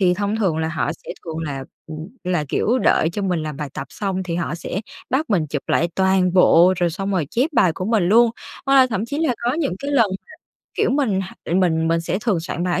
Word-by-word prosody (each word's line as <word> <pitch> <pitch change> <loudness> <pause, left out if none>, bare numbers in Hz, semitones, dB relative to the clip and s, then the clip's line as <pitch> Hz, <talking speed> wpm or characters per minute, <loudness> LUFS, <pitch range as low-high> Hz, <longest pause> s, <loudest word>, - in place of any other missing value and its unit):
Thì 180 -2 +4
thông 205 +2 -1
thường 190 -8 +1
là 160 0 -1
họ 160 -1 -1
sẽ - - -7
thường 160 -1 -5
là, 140 -4 -4 0.2
ừm, 155 +2 -7 0.2
là, 175 -4 0
kiểu, 245 - +1
đợi 160 - +3
cho 200 +4 -4
mình 180 -4 0
làm 155 -2 -5
bài 150 -2 -4
tập 135 - -5
xong 190 -2 -3
thì 170 -2 -4
họ 170 -1 -2
sẽ 180 +3 -4 0.3
bắt 265 +1 0
mình 170 -6 +2
chụp 145 -1 -4
lại 170 - +2
toàn 190 -1 +3
bộ, 180 0 +6
rồi 175 -1 +1
xong 195 +4 -4
rồi 170 -7 0
chép 260 +7 +1
bài 180 - +4
của 185 - -4
mình 220 -2 +2
luôn. 230 +2 +5 0.4
Hoặc 275 - +3
là 260 -1 +7
thậm 220 -3 -2
chí 285 +3 -4
là 315 -7 +1
có 245 - +2
những 290 - -1
cái 280 - -4
lần 240 -6 +4
mà, 190 - -6 0.5
kiểu, - - +2
mình 245 -9 +1
h 185 -2 -7
mình 165 -3 +2
mình 165 0 +1
sẽ 175 +2 -2
thường 205 -8 +1
soạn 170 +1 -4
bài 180 -1 0
185 Hz, 255 wpm, -21 LUFS, 165-220 Hz, 0.5 s, là